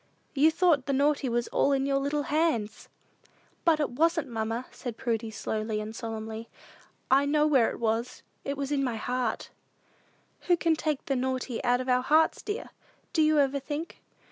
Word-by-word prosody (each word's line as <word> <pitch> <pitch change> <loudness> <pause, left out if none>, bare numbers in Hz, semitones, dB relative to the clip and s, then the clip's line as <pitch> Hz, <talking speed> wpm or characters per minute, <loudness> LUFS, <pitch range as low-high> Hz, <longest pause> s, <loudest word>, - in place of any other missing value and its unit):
You 300 +2 +5
thought 320 -5 +2
the 275 - +1
naughty 285 0 +2
was 235 0 0
all 280 - +2
in 270 0 +1
your 275 0 +1
little 285 +1 -1
hands!" 290 -8 -1 0.7
"But 325 -2 +4
it 295 - 0
wasn't, 325 +2 +1
mamma," 225 +1 -2
said 240 -3 -7
Prudy, 225 -2 -2
slowly 215 0 -3
and 215 +1 -6
solemnly. 225 0 -6 0.6
"I 275 +2 +5
know 300 +1 +3
where 270 -7 +4
it - - -7
was: 230 +2 -1 0.2
it 280 0 -3
was 280 0 -3
in 280 -2 +1
my 245 -3 -1
heart." 245 +1 -2 1.0
"Who 350 -1 +4
can 330 -1 +2
take 305 -2 -2
the 275 - 0
naughty 255 -1 -2
out 245 0 +2
of 255 - -6
our 250 0 +3
hearts, 310 +5 +3
dear? 415 +2 -5 0.4
Do 320 - +3
you 310 0 +4
ever 280 -1 +2
think?" 295 +4 -6
270 Hz, 180 wpm, -28 LUFS, 235-300 Hz, 1.0 s, You